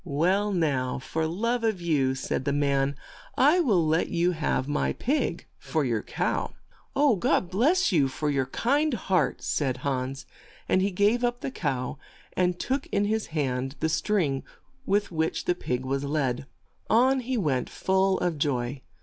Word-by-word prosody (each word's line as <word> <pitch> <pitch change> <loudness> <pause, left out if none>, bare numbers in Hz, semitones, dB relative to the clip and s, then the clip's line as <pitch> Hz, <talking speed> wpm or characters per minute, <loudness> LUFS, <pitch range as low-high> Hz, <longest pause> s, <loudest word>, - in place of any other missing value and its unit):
'Well 185 +6 +1
now, 140 -8 0
for 160 +4 -2
love 230 +8 -1
of 220 -4 +1
you," 145 -6 +1
said 130 0 -2
the 140 - +1
man, 140 -1 +1 0.4
"I 300 +7 +5
will 205 - +3
let 160 +2 +2
you 175 +1 +2
have 150 -5 -1
my 145 0 0
pig 260 - -1
for 155 -3 -1
your 115 -4 0
cow." - - -2 0.4
"God 220 -9 +2
bless 300 - +3
you 150 -7 +3
for 145 +3 -2
your 135 -2 0
kind 280 - +1
heart," 185 - 0
said 130 -4 0
Hans, 135 0 -2 0.4
and 185 - +3
he 195 - +2
gave 205 +6 +2
up 245 +1 0
the 270 - -3
cow, 135 - -3 0.3
and 180 -1 +1
took 270 +6 -2
in 200 0 0
his 220 +1 -1
hand 135 -3 -2
the 160 - 0
string 165 -6 +1 0.5
with 205 -1 +1
which 160 -1 -1
the 180 - +2
pig 130 -7 -3
was 135 +1 -1
led. 140 -3 -1 0.4
On 260 +4 +4
he 255 0 -2
went, 140 - 0
full 190 0 +1
of 170 -4 -1
joy. 130 -2 -1
165 Hz, 165 wpm, -27 LUFS, 140-210 Hz, 0.5 s, I